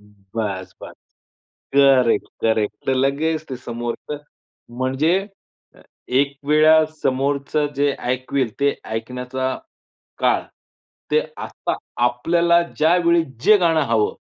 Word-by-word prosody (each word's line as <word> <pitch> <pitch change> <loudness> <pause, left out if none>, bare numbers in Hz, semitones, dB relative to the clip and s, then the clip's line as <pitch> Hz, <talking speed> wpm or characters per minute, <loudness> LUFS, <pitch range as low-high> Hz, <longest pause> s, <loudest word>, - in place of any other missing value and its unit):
बस-बस. 100 -2 -7 0.8
Correct correct. 115 -5 +2
लगेच 145 +4 0
ते 130 - -3
समोरचं 120 +4 -5 0.6
म्हणजे 135 +6 +1 1.1
एकवेळा 150 +3 +4 0.2
समोरचं 140 +3 0
जे 145 0 +2 0.2
ऐकवेल 130 -1 -1
ते 140 0 +2
ऐकण्याचा 125 +3 -4 0.7
काळ - - +2 0.7
ते - - +4 0.2
आता - - -4 0.3
आपल्याला 170 +8 +2 0.2
ज्यावेळी 170 +1 +3 0.2
जे 215 - +7
गाणं 165 -4 +2
हवं, 110 -2 +2
135 Hz, 85 wpm, -21 LUFS, 120-155 Hz, 1.1 s, जे